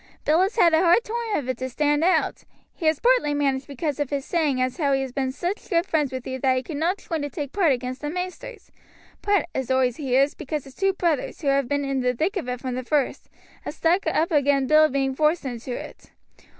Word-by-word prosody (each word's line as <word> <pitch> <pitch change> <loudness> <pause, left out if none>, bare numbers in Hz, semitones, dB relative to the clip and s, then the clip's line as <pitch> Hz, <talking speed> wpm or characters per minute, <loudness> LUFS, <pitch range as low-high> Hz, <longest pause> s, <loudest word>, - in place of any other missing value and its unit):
"Bill 315 +4 +4
has 390 +3 0
had 345 -7 +5
a 320 - +5
hard 350 +6 +4
toime 460 -1 -2
of 275 - -4
it 255 -2 -3
to 260 0 -3
stand 295 +3 +1
out. 370 +2 +1 0.3
He 325 - -3
has 315 -2 +2
partly 485 -12 +3
managed 275 -2 0
because 285 +1 -3
of 290 -3 -1
his 280 -1 -3
saying 305 -7 0
as 255 +2 -1
how 285 -5 +1
he 270 - +1
has 265 - -6
been 265 0 -1
sich 350 +9 -4
good 340 -3 +2
friends 300 -7 0
with 260 -1 -5
you 260 0 -4
that 260 0 +2
he 255 - -2
could 305 0 -6
not 340 +6 0
join 330 -7 -4
to 290 - -3
take 285 0 -5
part 370 -7 +3
against 255 0 -3
the 295 - -3
maisters; 365 +7 -6 0.5
part, 405 -2 +2
as 265 -1 -3
oi 260 -1 +3
hears, 270 +2 +1
because 300 -1 -4
his 270 - -14
two 390 +5 +1
brothers, 335 -7 -1
who 275 -2 +2
been 285 +3 -1
in 275 -1 -1
the 250 0 0
thick 340 - -1
of 330 -10 -3
it 250 0 -3
from 255 -2 -3
the 255 +1 -3
first, 285 +1 -1 0.3
has - - -7
stuck 340 +2 +1
up 320 +1 +1
agin 285 -2 +3
Bill 310 +2 +5
being 270 0 0
forced 305 +3 +1
into 245 -1 -5
it. - - -8
290 Hz, 240 wpm, -24 LUFS, 265-335 Hz, 0.5 s, had